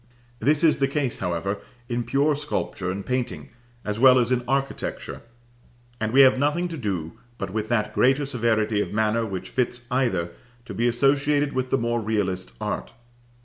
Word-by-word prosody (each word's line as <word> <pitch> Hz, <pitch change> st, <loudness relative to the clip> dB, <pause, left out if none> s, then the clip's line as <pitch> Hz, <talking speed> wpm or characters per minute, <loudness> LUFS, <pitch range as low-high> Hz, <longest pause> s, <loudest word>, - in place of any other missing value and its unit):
This 150 Hz, +3 st, +2 dB
is 160 Hz, -3 st, +4 dB
the 135 Hz, -, +3 dB
case, 140 Hz, -3 st, -1 dB
however, 95 Hz, +3 st, -2 dB, 0.3 s
in 120 Hz, -1 st, -1 dB
pure 140 Hz, +5 st, +2 dB
sculpture 140 Hz, -10 st, -3 dB
and 95 Hz, +1 st, -4 dB
painting, 125 Hz, -1 st, -3 dB, 0.4 s
as 105 Hz, +1 st, -2 dB
well 130 Hz, 0 st, +7 dB
as 125 Hz, 0 st, +2 dB
in 125 Hz, -1 st, +1 dB
architecture; 135 Hz, +1 st, -2 dB, 0.8 s
and 110 Hz, 0 st, -1 dB
we 135 Hz, +3 st, +7 dB
have 130 Hz, -1 st, +6 dB
nothing 150 Hz, +5 st, +1 dB
to 165 Hz, -, -5 dB
do 95 Hz, -, -4 dB, 0.2 s
but 100 Hz, -3 st, -4 dB
with 110 Hz, +1 st, -3 dB
that 105 Hz, -3 st, 0 dB
greater 135 Hz, +3 st, +3 dB
severity 110 Hz, -5 st, +1 dB
of -, -, -3 dB
manner 110 Hz, +1 st, +1 dB
which 95 Hz, -3 st, -6 dB
fits 125 Hz, -1 st, -1 dB
either 110 Hz, -10 st, 0 dB, 0.3 s
to -, -, -7 dB
be 120 Hz, +2 st, +1 dB
associated 145 Hz, +3 st, +2 dB
with 130 Hz, 0 st, -1 dB
the 135 Hz, -, +2 dB
more 120 Hz, -1 st, 0 dB
realist 95 Hz, -, -1 dB
art. -, -, -4 dB
120 Hz, 175 wpm, -24 LUFS, 105-135 Hz, 0.8 s, well